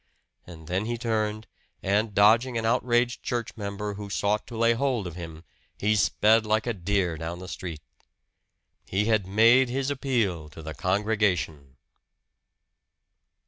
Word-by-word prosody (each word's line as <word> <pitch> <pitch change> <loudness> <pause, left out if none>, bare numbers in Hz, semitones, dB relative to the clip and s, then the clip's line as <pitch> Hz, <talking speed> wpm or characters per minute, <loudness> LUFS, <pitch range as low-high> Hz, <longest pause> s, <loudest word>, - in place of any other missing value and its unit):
And 80 -3 -12
then 95 +5 -1
he 120 +1 -2
turned, 110 -2 -1 0.4
and 105 +2 0
dodging 115 +4 +4
an 110 - -2
outraged 120 +1 +1
church 120 -3 -3
member 105 -1 -4
who 100 0 -7
sought 105 +1 0
to 115 - -8
lay 115 +1 +4
hold 125 -4 -1
of 85 -2 -6
him, 80 -2 -8 0.3
he 105 +1 +1
sped 110 +2 +3
like 110 0 0
a 120 - -1
deer 90 -3 -1
down 80 +2 -5
the 90 +1 -9
street. 85 -2 -6 1.1
He 100 +2 0
had 110 -4 +1
made 115 +6 +5
his 135 +2 -1
appeal 110 - -1
to 80 +2 -11
the 80 0 -6
congregation! 90 -8 -1
105 Hz, 145 wpm, -26 LUFS, 90-115 Hz, 1.1 s, made